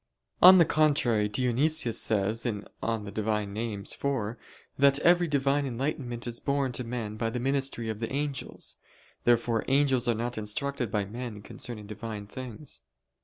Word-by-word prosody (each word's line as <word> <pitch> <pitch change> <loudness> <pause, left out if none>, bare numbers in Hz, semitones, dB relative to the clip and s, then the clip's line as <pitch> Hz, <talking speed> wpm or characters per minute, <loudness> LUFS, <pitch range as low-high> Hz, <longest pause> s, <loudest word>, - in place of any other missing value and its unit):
On 185 +1 +10
the 170 - +6
contrary, 135 -10 +2
Dionysius 125 +3 +3
says 110 +1 +1
(Div. 105 -4 -3 0.2
Nom. 115 -2 -2
iv) 100 - -9
that 110 +5 -1
every 175 0 +5
Divine 140 -1 +1
enlightenment 125 -1 -3
is 120 -1 -4
borne 140 -2 0
to 125 - -3
men 115 -3 -5
by 115 0 -1
the 125 +2 -3
ministry 135 -2 -1
of 110 -1 -4
the 115 -1 -4
angels. 140 -1 -3 0.5
Therefore 120 -1 +2
angels 135 -2 +2
are 120 - +2
not 120 +1 -3
instructed 120 +4 -2
by 105 -1 -1
men 110 0 -7
concerning 110 -2 -7
Divine 105 0 -6
things. 125 - -7
120 Hz, 145 wpm, -28 LUFS, 110-140 Hz, 0.5 s, On